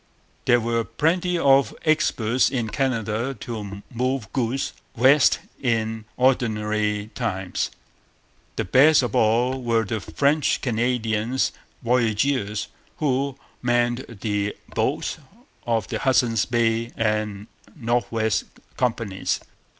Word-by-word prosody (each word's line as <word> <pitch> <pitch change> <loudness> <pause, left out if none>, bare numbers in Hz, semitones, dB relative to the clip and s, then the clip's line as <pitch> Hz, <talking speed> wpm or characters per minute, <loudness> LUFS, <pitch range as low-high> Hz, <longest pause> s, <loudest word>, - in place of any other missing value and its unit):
There 120 -2 +5
were 115 0 0
plenty 175 +9 0
of 140 -3 +4
experts 130 -6 +2
in 120 -5 -2
Canada 120 0 -1
to 100 -4 -6
move 125 -3 -2
goods 130 +1 -1 0.2
west 130 +4 +5 0.2
in 110 -3 -1
ordinary 105 -4 +1
times. 95 -6 -2 0.9
The - - -1
best 140 +8 +6
of 120 - -2
all 120 +4 +2
were 115 -2 +1
the 110 +2 -2
French 145 +8 +1
Canadian 120 -1 0 0.5
voyageurs 115 -2 +1 0.3
who 140 -2 0 0.2
manned 120 0 +1 0.2
the 105 -1 -1 0.2
boats - - -1 0.5
of 115 -5 0
the - - -2
Hudson's 120 -4 +2
Bay 115 0 +1
and 105 -2 -1 0.3
North 120 -3 -1
West 110 -2 0 0.3
Companies. 115 -6 -1
115 Hz, 105 wpm, -24 LUFS, 110-130 Hz, 0.9 s, best